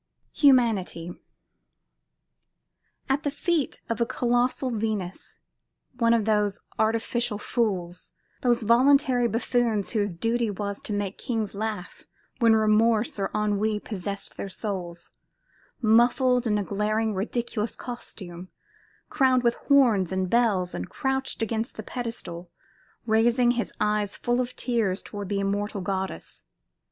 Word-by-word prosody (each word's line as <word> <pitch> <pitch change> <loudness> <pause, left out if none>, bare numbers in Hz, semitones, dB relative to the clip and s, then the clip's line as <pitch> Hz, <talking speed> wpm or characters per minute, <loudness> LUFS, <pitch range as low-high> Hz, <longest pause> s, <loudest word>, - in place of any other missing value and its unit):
HUMANITY 225 - +3 2.0
At 270 +2 +1
the 290 - -1
feet 310 +1 -1
of 230 0 -2
a - - +4
colossal 245 +1 0
Venus, 210 -5 -3 0.6
one 230 -1 +4
of 220 -3 0
those 210 -2 +1 0.2
artificial 225 +1 0
fools, 190 -6 -2 0.3
those 240 -2 +2
voluntary 250 +1 +4
buffoons 230 -2 0
whose 205 -5 -1
duty 230 +5 0
was 200 0 -4
to - - -6
make 205 -1 -3
kings 225 -4 -2
laugh 210 -2 -5 0.3
when 230 -2 +5
Remorse 220 0 +2
or 195 - 0
Ennui 210 0 +1
possessed 200 -1 -5
their 195 - -5
souls, 175 -4 -5 0.7
muffled 245 +2 +4
in 210 -1 +2
a 205 - 0
glaring 215 +2 0
ridiculous 220 +2 -2
costume, 185 -7 -7 0.6
crowned 260 -4 +3
with 235 -1 +3
horns 235 - +4
and 190 -1 -1
bells, 210 -7 +2
and 90 - -5
crouched 265 -3 -1
against 225 +1 -2
the - - -5
pedestal, 185 -8 -5 0.6
raised 230 +2 +3
his 240 -1 +2
eyes 210 -1 0
full 240 +1 0
of 250 0 -5
tears 220 -6 0
toward 205 -2 -7
the 200 -1 0
immortal 200 +1 -1
goddess. 190 +1 -4
220 Hz, 125 wpm, -26 LUFS, 200-240 Hz, 2.0 s, when